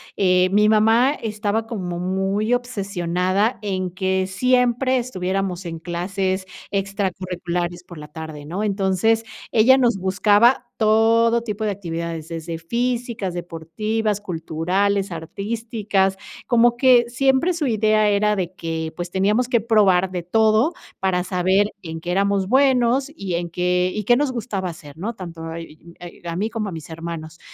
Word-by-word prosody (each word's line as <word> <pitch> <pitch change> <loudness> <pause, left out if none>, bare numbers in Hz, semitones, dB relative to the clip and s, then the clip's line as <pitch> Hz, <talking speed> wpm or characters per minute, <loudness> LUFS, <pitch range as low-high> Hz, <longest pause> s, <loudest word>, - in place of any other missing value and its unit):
eh, 185 -1 +3
mi 210 +1 +4
mamá 225 +5 +4
estaba 215 -3 -2
como 180 -6 -4
muy 195 +5 0
obsesionada 200 -3 -1
en 185 -3 -2
que 190 +1 0
siempre 250 +5 +2
estuviéramos 190 -5 -3
en 165 -1 -5
clases 185 +3 -2 0.3
extracurriculares 180 -3 -3
por 175 -1 -12
la 150 0 -9
tarde, 155 -1 -8
¿no? 180 +7 -3
Entonces, 205 +2 +1 0.3
ella 240 +4 +6
nos 240 -5 +2
buscaba 205 +6 +3
todo 230 +2 +3
tipo 220 -2 -4
de 210 - +1
actividades, 170 -4 -5
desde 165 0 -5
físicas, 235 +1 -2
deportivas, 195 +6 -3
culturales, 190 +3 -1
artísticas. 200 +3 -2 0.3
Como 240 0 +3
que 245 -2 +5
siempre 265 +7 +2
su 330 -3 -2
idea 215 -2 +3
era 210 +1 +2
de 185 -2 -3
que, 160 -2 -4
pues 175 +1 -5
teníamos 210 +6 +1
que 240 - +3
probar 200 -5 +3
de 180 -1 -3
todo 220 - +3 0.3
para 185 -2 +1
saber 190 +3 +1
en 160 -2 -6
qué 175 +2 -4
éramos 195 0 +1
buenos 260 +2 +3
y 195 - -4
en 170 0 -3
qué 180 +1 +1
y 210 - -3
qué 240 +4 +4
nos 285 -1 +1
gustaba 210 -7 -3
hacer, 150 -4 -11
¿no? 210 +8 -3
Tanto 165 -4 -7
eh, 165 - -5
y 165 +1 -15
eh, 175 -1 -11
a 165 - -3
mí 205 +5 -1
como 220 -3 -3
a - - -7
mis 160 -2 -8
hermanos. 165 -1 -7
195 Hz, 155 wpm, -22 LUFS, 175-225 Hz, 0.3 s, ella